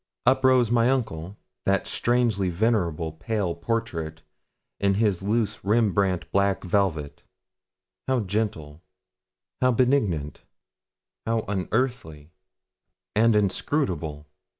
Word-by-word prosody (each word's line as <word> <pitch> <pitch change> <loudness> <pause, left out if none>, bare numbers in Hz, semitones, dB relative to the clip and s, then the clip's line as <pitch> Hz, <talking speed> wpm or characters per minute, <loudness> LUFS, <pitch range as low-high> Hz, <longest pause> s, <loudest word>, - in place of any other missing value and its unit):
Up 130 +2 +3
rose 130 -3 +4
my 120 0 +4
uncle, 105 -8 -2 0.3
that 100 -1 +2
strangely 115 -6 +1
venerable, 85 -5 0
pale 90 +3 -2
portrait, 85 -5 -3 0.6
in 100 -1 +2
his 105 -4 +1
loose 105 +2 -1
Rembrandt 100 -4 +1
black 100 0 +1
velvet. 85 -6 -1 0.9
How 130 -2 +2
gentle, 90 -7 -3 0.8
how 125 0 +4
benignant, 110 - +1 0.9
how 115 0 +1
unearthly, 95 - -2 0.8
and 115 +1 +4
inscrutable! 95 - -1
100 Hz, 95 wpm, -25 LUFS, 85-115 Hz, 0.9 s, rose